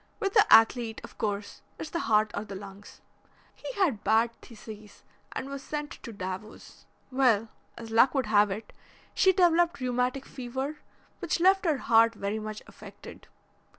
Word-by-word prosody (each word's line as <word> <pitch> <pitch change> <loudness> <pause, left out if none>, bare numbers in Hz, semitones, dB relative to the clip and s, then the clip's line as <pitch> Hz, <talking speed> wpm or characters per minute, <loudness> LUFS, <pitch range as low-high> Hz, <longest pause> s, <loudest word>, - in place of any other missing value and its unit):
With 390 -1 -1
the 425 -1 +4
athlete, 225 0 +5
of - - -13
course, 205 -1 -3 0.2
it's 310 - -7
the 340 - -2
heart 215 -4 +2
or 205 - -3
the 200 -2 -8
lungs. 195 +1 -11 0.5
He - - -7
had 340 - 0
bad 225 +2 +3
phthisis 215 -3 -12 0.3
and 265 - -5
was 275 0 -6
sent 295 +1 -5
to 235 - -8
Davos. 190 +1 -8 0.2
Well, 240 -5 +2 0.3
as 230 -1 -9
luck 250 +4 +4
would 265 -2 +1
have 210 -1 +4
it, 205 +3 -6 0.4
she 380 - +4
developed 345 -3 +3
rheumatic 250 +1 -1
fever, 265 +4 -5 0.4
which 350 -2 -1
left 380 +2 +4
her 310 -4 +2
heart 230 -2 +4
very 205 +2 -3
much 215 0 -7
affected. - - -13
235 Hz, 160 wpm, -28 LUFS, 215-290 Hz, 0.5 s, athlete